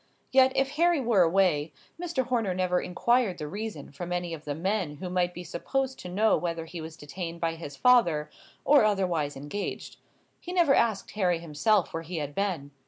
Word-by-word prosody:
Yet, 260 0 +6
if 270 0 +2
Harry 340 -1 +4
were 230 -7 +3
away, 165 -4 +2 0.3
Mr. 325 -7 -1
Horner 230 -7 0
never 180 -1 +1
inquired 220 +1 +1
the 150 - -5
reason 200 -4 -6
from 175 +5 -7
any 175 -1 -2
of 155 -1 -8
the 145 -1 -3
men 185 -2 -1
who 180 +4 -6
might 180 -1 +1
be 175 0 -8
supposed 265 +10 -2
to 180 - -7
know 215 +5 +3
whether 165 -2 -3
he 165 0 -7
was 160 0 -8
detained 170 +3 -6
by 165 -1 0
his 160 -4 -8
father, 225 -12 +4 0.3
or 285 -4 +6
otherwise 180 -9 0
engaged; 145 +9 -5 0.4
he 355 - -7
never 340 -6 +4
asked 220 -6 +1
Harry 180 -5 +1
himself 170 +5 +1
where 165 - -2
he 165 +1 -6
had 145 -2 -4
been. 170 -7 -2
180 Hz, 190 wpm, -28 LUFS, 165-220 Hz, 0.4 s, Yet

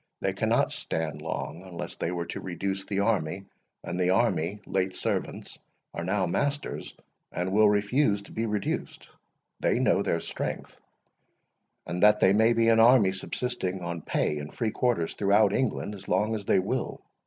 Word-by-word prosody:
They - - -1
cannot - - +1
stand 80 -2 -2
long 80 +1 -4
unless 90 -2 -6
they - - -3
were 85 -1 -3
to - - -5
reduce 95 +1 -3
the 100 -1 -1
army; 95 -3 0 0.4
and 90 +1 -4
the 90 0 +2
army, 100 -2 +1
late 95 -1 -1
servants, - - -3 0.3
are - - -4
now 95 +2 +1
masters, 145 +11 -2 0.4
and 90 +1 -2
will 105 +1 +5
refuse 105 +1 +2
to - - -15
be 115 +1 -2
reduced. 105 -2 -3 0.5
They - - +2
know - - +3
their 85 - 0
strength, - - -5 1.0
and 90 0 -4
that 105 0 +6
they 95 - +5
may 110 +3 +4
be 115 0 +2
an 115 0 +5
army 115 -4 +6
subsisting 95 -2 -3
on 85 -1 -4
pay 75 0 -1
and 75 +1 -7
free 115 -2 -2
quarters 120 -11 0
throughout 100 0 +3
England 115 -4 -1
as 100 -2 -11
long 110 +1 +1
as 105 -3 -4
they - - +3
will. 105 +7 -2
100 Hz, 170 wpm, -27 LUFS, 90-110 Hz, 1.0 s, that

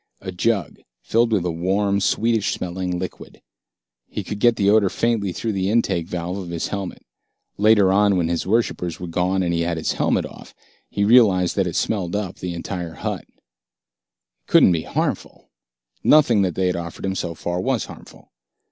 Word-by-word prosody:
A 95 - -6
jug, 100 -1 -1 0.2
filled 115 +1 +2
with 100 -5 +1
a 90 - 0
warm, 100 +4 0
sweetish 110 +1 +1
smelling 90 0 -3
liquid. 90 +1 -7 0.7
He - - -4
could 105 - -6
get 120 +1 +4
the 100 -2 +1
odor 105 -1 +4
faintly 115 -4 0
through 110 +5 -3
the 95 -1 -1
intake 95 -7 +1
valve 90 +2 -4
of 90 -3 -7
his 85 -1 -3
helmet. 100 -3 -5 0.5
Later 105 -2 +5
on, 100 -1 +3
when 85 -2 +1
his 85 +1 -2
worshippers 95 -6 0
were 90 - -5
gone 90 +2 0
and 85 -1 0
he 85 - 0
had 85 0 -1
his 80 - -1
helmet - - 0
off, - - -12 0.3
he 100 - -1
realized 100 -7 +4
that 95 -2 +1
it 85 - -4
smelled 95 -4 -1
up 100 -3 -3
the 90 -1 -5
entire 85 -1 -5
hut. - - -4
It - - -37 1.1
couldn't - - +6
be 85 -2 +1
harmful. - - -4 0.5
Nothing 125 -9 +5
that 95 -3 0
they 95 - 0
had 90 - +1
offered 85 +1 -6
him 95 - -1
so 85 -3 -4
far 85 +2 -3
was 130 -1 0
harmful. - - -14
95 Hz, 185 wpm, -22 LUFS, 85-105 Hz, 1.1 s, couldn't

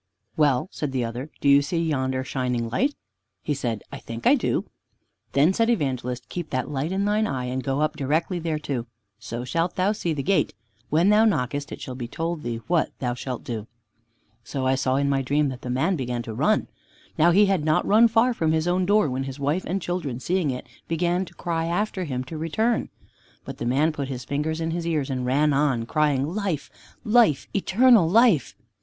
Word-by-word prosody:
"Well," 145 -1 +2
said 145 -3 -4
the 125 -2 0
other, 120 +5 -5
"do - - 0
you 140 0 +7
see 170 +5 -2
yonder 130 -5 0
shining 125 -3 -2
light?" 275 - +1 0.5
He 150 - 0
said, 120 -6 -3
"I - - -7
think 115 0 -8
I - - +7
do." - - 0 0.7
Then 150 +7 +4
said 230 +3 +2
Evangelist, 125 - -1
"Keep 175 -3 -5
that 130 +2 -2
light 145 +4 -2
in 195 +1 0
thine 210 +1 +2
eye, 130 -2 -3
and 130 +1 -3
go 135 +1 -1
up 155 0 0
directly 160 +5 0
thereto, 150 -7 -3 0.3
so 120 +1 -5
shalt 165 +6 -1
thou 190 +2 +2
see 175 -5 -2
the 145 -3 -2
gate. 195 - +1 0.3
When 165 +6 +3
thou 210 +1 +5
knockest, 140 - 0
it - - -7
shall 130 - -6
be 125 -2 -5
told 165 +5 -3
thee 115 -3 -4
what 170 -2 +1
thou 125 -2 -2
shalt 125 0 -5
do." 115 -3 -5 0.8
So 130 +3 -3
I 130 - +3
saw 130 -1 +1
in 140 +1 +1
my 135 -1 +1
dream 145 +2 +1
that 130 -1 -7
the 125 - -6
man 140 +10 +1
began 125 -4 -3
to 115 - -6
run. - - +1 0.5
Now 165 +3 +4
he 200 +4 +5
had 195 -5 +1
not 155 0 +2
run 220 +3 +6
far 230 +3 +3
from 160 -7 0
his 160 +1 0
own 180 +1 +1
door 205 -4 +4
when 130 0 -2
his 135 +1 -7
wife 145 +6 0
and 190 +3 -1
children, 170 -9 -3
seeing 175 +2 0
it, 125 -1 -4 0.2
began 175 +3 0
to - - -15
cry 165 -2 -2
after 185 +2 -1
him 130 -4 -3
to 155 +4 -7
return. 220 +9 0 0.6
But - - -8
the - - -3
man 145 +6 +2
put 145 -3 -4
his 125 -2 -6
fingers 155 +4 -2
in 165 0 -1
his 170 0 -3
ears, 150 -5 -1
and 130 -1 -2
ran 145 +3 +3
on, 135 -5 +1
crying, 145 0 +1
"Life, 185 -4 -3 0.3
life, 215 - +3
eternal 210 -1 +4
life!" 215 - +4
150 Hz, 210 wpm, -24 LUFS, 130-175 Hz, 0.8 s, you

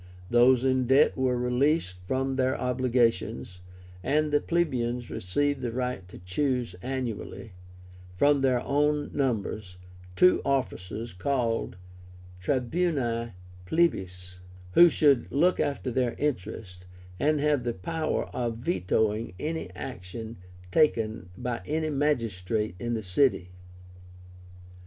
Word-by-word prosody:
Those 120 +1 +5
in 130 -1 +2
debt 135 +4 +5
were 130 -1 +1
released 125 - +1
from 135 +2 0
their 130 0 +1
obligations, 120 -6 0 0.4
and 150 +7 +1
the 145 - +3
plebeians 125 -8 -1
received 145 +9 -1
the 120 -2 -2
right 125 -6 -3
to - - -11
choose 120 +5 -1
annually, 125 -4 -5 0.6
from 145 +9 +3
their 130 -2 +2
own 145 +2 +1
numbers, 110 -8 -2 0.4
two 180 - +5
officers 115 -5 -2
called 115 +2 -1 0.7
TRIBÚNI 125 - 0 0.3
PLEBIS, 90 - 0 0.3
who 175 - +8
should 140 -6 +3
look 175 +6 +3
after 140 -3 -1
their 125 -1 0
interests, 110 -8 -3 0.4
and 150 0 +2
have 145 -3 +2
the 120 - 0
power 155 - -2
of 120 -2 -3
VETOING 105 +1 0
any 160 - -3
action 110 +6 -7 0.3
taken 110 - +1
by 125 -2 -3
any 155 +1 -1
magistrate 115 -8 0
in 120 0 -2
the 110 - -4
city. 90 -2 +1
125 Hz, 115 wpm, -27 LUFS, 110-145 Hz, 0.7 s, who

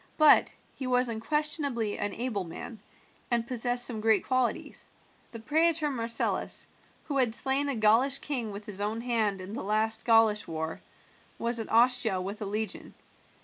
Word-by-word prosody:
But 310 -1 +5 0.2
he 260 - -5
was 250 -1 +2
unquestionably 280 -2 -1
an 205 - -1
able 230 -5 -2
man, 195 +6 -9 0.5
and 235 -2 +2
possessed 245 0 0
some 225 -3 -2
great 220 -1 +3
qualities. 255 -2 -1 0.4
The 230 - -7
praetor 310 +5 +2
Marcellus, 230 -3 -1 0.4
who 285 -3 -3
had 245 -4 +3
slain 270 +2 0
a 275 - -1
Gaulish 230 +5 +3
king 250 -7 -3
with 200 +1 -8
his 205 -2 -4
own 215 +2 -1
hand 220 -5 0
in 185 +3 -8
the - - -5
last 220 +2 0
Gaulish 225 -2 +3
war, 160 0 -5 0.6
was 235 0 0
at 225 - -5
Ostia 230 -4 +3
with 200 +4 -6
a - - -2
legion. 210 0 -3
230 Hz, 160 wpm, -28 LUFS, 215-255 Hz, 0.6 s, But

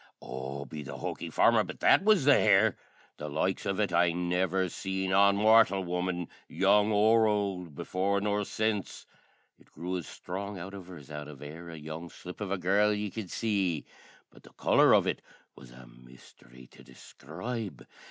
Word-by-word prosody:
O, 65 +3 -6
be 75 +3 -8
the 70 - -8
hoky - - -5
farmer, - - +4
but - - -9
that - - +5
was 210 -9 +4
the 145 - +7
hair! 100 -6 +4 0.4
The 75 - -6
likes 80 +6 -1
of 95 0 -1
it 100 -4 0
I 85 0 +3
never 90 +1 0
seen 95 +1 -3
on 100 +1 +5
mortial 105 -2 +5
woman, 90 -1 -2 0.2
young 105 +2 +3
or 110 +2 +4
ould, 95 -6 -2
before 95 +6 -1
nor 105 0 0
sense. 110 -1 -2 0.5
It - - -24
grew 90 +2 -5
as 85 - -7
sthrong 100 +2 -6
out 90 +3 -8
of 95 -3 -9
her 90 -1 -10
as 75 0 -14
out 75 0 -6
of 75 -2 -11
e'er 80 +4 -9
a 80 - -8
young 80 +2 -7
slip 90 +5 -11
of 100 - -3
a 100 - -1
girl 100 +4 +2
ye 105 -1 -2
could 105 -3 -6
see; 95 -9 -1 0.5
but - - -18
the - - -18
colour - - +4
of - - +5
it - - -2 0.3
was 65 - -14
a 65 +1 -14
misthery - - -17
to - - -16
describe. 95 - -8
95 Hz, 185 wpm, -29 LUFS, 80-100 Hz, 0.5 s, the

